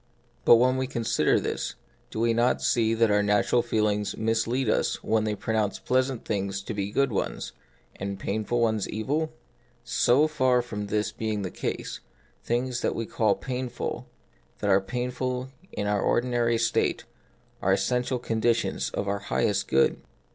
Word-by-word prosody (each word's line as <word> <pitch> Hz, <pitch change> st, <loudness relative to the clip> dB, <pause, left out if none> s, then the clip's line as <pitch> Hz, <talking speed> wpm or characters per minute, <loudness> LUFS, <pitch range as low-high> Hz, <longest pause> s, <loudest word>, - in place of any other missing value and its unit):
But -, -, +9 dB
when 130 Hz, +2 st, +3 dB
we 130 Hz, 0 st, -1 dB
consider 120 Hz, -3 st, +1 dB
this, -, -, -3 dB, 0.3 s
do -, -, -5 dB
we 115 Hz, 0 st, +3 dB
not 120 Hz, +2 st, +2 dB
see 115 Hz, -1 st, +2 dB
that 115 Hz, -1 st, +3 dB
our 105 Hz, 0 st, +4 dB
natural 105 Hz, +4 st, +3 dB
feelings 105 Hz, -2 st, 0 dB
mislead 115 Hz, +3 st, 0 dB
us 110 Hz, -, 0 dB
when 110 Hz, -1 st, +1 dB
they 105 Hz, -1 st, -1 dB
pronounce 110 Hz, -1 st, -1 dB
pleasant 130 Hz, -1 st, 0 dB
things 100 Hz, -2 st, -2 dB
to 110 Hz, -, -5 dB
be 100 Hz, -2 st, -2 dB
the 105 Hz, -, -10 dB
good 140 Hz, -2 st, +2 dB
ones, 100 Hz, -, -2 dB, 0.5 s
and 100 Hz, +1 st, -4 dB
the -, -, -14 dB
painful 110 Hz, +4 st, -1 dB
ones 110 Hz, -3 st, +1 dB
evil? 145 Hz, +9 st, -1 dB, 0.5 s
So 120 Hz, +4 st, +3 dB
far 130 Hz, -5 st, +2 dB
from 105 Hz, -3 st, -5 dB
this 105 Hz, +1 st, 0 dB
being 110 Hz, -2 st, -2 dB
the 90 Hz, -, -4 dB
case, -, -, -4 dB, 0.4 s
things 120 Hz, +1 st, -1 dB
that -, -, 0 dB
we 115 Hz, -, -2 dB
call 110 Hz, -2 st, +1 dB
painful, 125 Hz, -1 st, -4 dB, 0.5 s
that 100 Hz, -, 0 dB
are 95 Hz, +1 st, +5 dB
painful 125 Hz, +3 st, -3 dB, 0.2 s
in 105 Hz, -, -3 dB
our 105 Hz, -1 st, +1 dB
ordinary 120 Hz, -1 st, +2 dB
state, 115 Hz, 0 st, +1 dB, 0.6 s
are 95 Hz, -, +2 dB
essential 125 Hz, +6 st, 0 dB
conditions 115 Hz, -1 st, 0 dB
of 100 Hz, -, -2 dB
our 100 Hz, 0 st, 0 dB
highest 100 Hz, 0 st, 0 dB
good. 65 Hz, -, +2 dB
115 Hz, 165 wpm, -27 LUFS, 105-125 Hz, 0.6 s, But